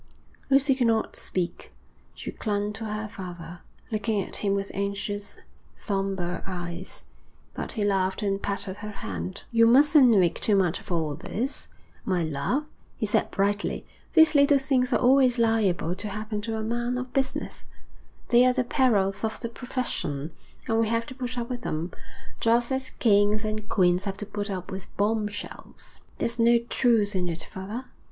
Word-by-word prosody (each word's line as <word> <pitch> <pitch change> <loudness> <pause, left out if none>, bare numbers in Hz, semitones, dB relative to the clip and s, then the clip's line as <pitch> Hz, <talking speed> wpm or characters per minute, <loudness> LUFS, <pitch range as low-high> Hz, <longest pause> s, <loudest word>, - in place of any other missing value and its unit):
Lucy 275 0 +5
could 255 -2 +1
not 225 -1 +1
speak. 175 -2 -4 0.4
She - - -6
clung 205 -1 -2
to 220 +2 -6
her 215 0 -3
father, 175 -5 -8 0.3
looking 215 0 0
at - - -4
him 200 -1 +1
with 195 0 -3
anxious, 200 +1 -3 0.4
sombre 195 -3 -2
eyes; 175 -1 -6 0.5
but - - -4
he 215 - -1
laughed 190 -1 +1
and 195 -1 0
patted 200 -1 -3
her 210 0 -6
hand. 90 - -5
'You 230 -1 +5
mustn't 280 +2 +7
make 185 -7 +3
too 210 - +3
much 185 -3 +2
of - - -11
all 160 -3 0
this, 250 - -4 0.4
my 180 -3 0
love,' 160 - -1 0.3
he - - -1
said - - +1
brightly. 205 +1 -1 0.3
'These 320 -2 +7
little 285 -1 +6
things 265 -1 +1
are - - +4
always 255 -1 +4
liable 220 -7 +2
to 205 +3 -2
happen 215 +1 -4
to 225 +1 -3
a 220 - -2
man 240 +2 -1
of 250 0 -5
business; 270 -1 -2 0.7
they 240 +1 +6
are 255 - +4
the 255 0 +1
perils 205 -7 +2
of 220 0 -2
the 235 - -3
profession, 200 - -3 0.4
and 225 -1 +2
we 225 - +3
have 230 0 0
to 255 - -8
put 255 -1 -5
up 235 -1 -2
with 245 -1 -4
them, 160 +3 -3 0.5
just 235 +2 +2
as 265 0 -1
kings 210 -1 +3
and 215 0 -4
queens 180 0 +3
have 195 -1 -3
to 210 - -2
put 205 0 -4
up 185 -2 -4
with 190 -1 -6
bomb 210 +1 +1
shells.' 205 0 -8 0.2
'There's 235 +1 -2
no 235 +1 +6
truth 230 -3 +2
in 180 -1 0
it, 165 -1 -3
father?' 210 +7 -6
210 Hz, 175 wpm, -26 LUFS, 195-240 Hz, 0.7 s, mustn't